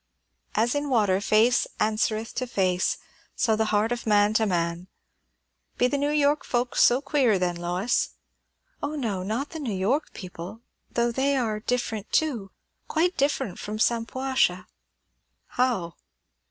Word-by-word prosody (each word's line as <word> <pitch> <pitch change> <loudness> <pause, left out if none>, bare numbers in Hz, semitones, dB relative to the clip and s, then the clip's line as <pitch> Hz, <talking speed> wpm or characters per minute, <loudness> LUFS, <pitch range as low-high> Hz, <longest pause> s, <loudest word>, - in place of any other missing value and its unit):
"'As 230 +3 +2
in 290 0 -1
water 205 -6 +2
face 220 +4 +3
answereth 215 +1 0
to 255 0 -3
face, 185 -5 +1 0.4
so 225 -3 +2
the 220 +1 +1
heart 215 +1 +1
of 240 -1 -3
man 205 0 +4
to 220 0 +2
man.' 170 -1 -1 0.9
Be 245 - +3
the 280 +3 +1
New 285 +1 +1
York 295 0 +2
folks 245 0 0
so 245 +2 +5
queer, 275 -7 +2
then, 180 -1 0
Lois?" 180 +6 -1 0.7
"O 290 +1 -3
no, 220 -10 -2
not 220 +9 -3
the 325 - -6
New 265 -7 -3
York 230 +11 0
people; 180 +3 -8 0.3
though 235 0 +1
they 275 +3 +1
are 220 -4 -1
different 220 -2 -2
too; 245 -11 0 0.4
quite 350 +3 +1
different 270 -8 0
from 210 +1 -5
Shampuashuh 230 -4 +1 0.5
" - - -49
"How?" 210 -10 +1
225 Hz, 150 wpm, -26 LUFS, 200-265 Hz, 0.9 s, so